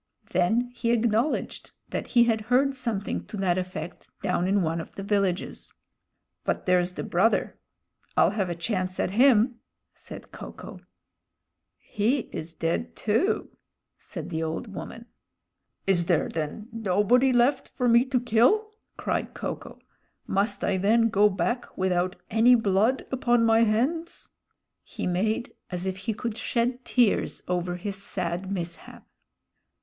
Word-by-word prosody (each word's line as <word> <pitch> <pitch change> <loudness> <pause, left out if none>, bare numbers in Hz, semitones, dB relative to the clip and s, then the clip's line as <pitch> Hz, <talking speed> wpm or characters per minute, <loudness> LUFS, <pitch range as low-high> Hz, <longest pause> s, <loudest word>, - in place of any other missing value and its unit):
Then 220 +8 +1
he 235 -1 -2
acknowledged 235 +4 0 0.2
that - - -3
he 240 -2 +5
had 225 -2 +1
heard 270 +2 +3
something 230 -6 -3
to 210 - -7
that 185 -2 +1
effect 185 -1 -6 0.2
down 180 -2 +1
in 195 0 +2
one 165 +1 -1
of - - -12
the 195 - -6
villages. 195 -3 -1 0.7
"But - - -2
there's 180 -1 +2
the - - -5
brother. 195 +7 +1 0.6
I'll - - +5
have 195 -4 -1
a 175 - -2
chance 185 +1 -2
at - - 0
him," 240 +1 +4 0.3
said - - -11
Ko - - -9
ko. - - -10 1.0
"He 230 +6 0
is 160 +1 -6
dead, 85 - -2
too," - - 0 0.4
said - - -8
the 160 - -2
old 165 +7 -4
woman. 230 +4 -8 0.8
"Is 175 -3 +2
there 175 -4 +2
then 160 +7 -4
nobody 225 +5 +3
left 250 +3 +2
for 250 - -2
me 235 +1 +6
to 260 -2 +1
kill!" 250 - +3 0.3
cried - - -2
Ko - - -3
ko. - - -13 0.5
"Must 200 +1 0
I 195 - +1
then 225 +4 +3
go 210 -1 +4
back 190 +6 -2
without 185 -1 0 0.2
any 235 +3 +6
blood 220 +3 +2
upon 240 -3 +2
my 225 0 +5
hands?" 280 +11 -1 0.5
He - - -6
made 215 +6 -1 0.2
as 180 0 -4
if 190 0 -2
he 220 +4 -3
could 230 0 -4
shed 245 +2 -1
tears 240 -5 +1
over 180 0 -1
his 195 +2 -5
sad 185 -1 -3
mishap. 175 -3 -6
210 Hz, 145 wpm, -26 LUFS, 180-240 Hz, 1.0 s, me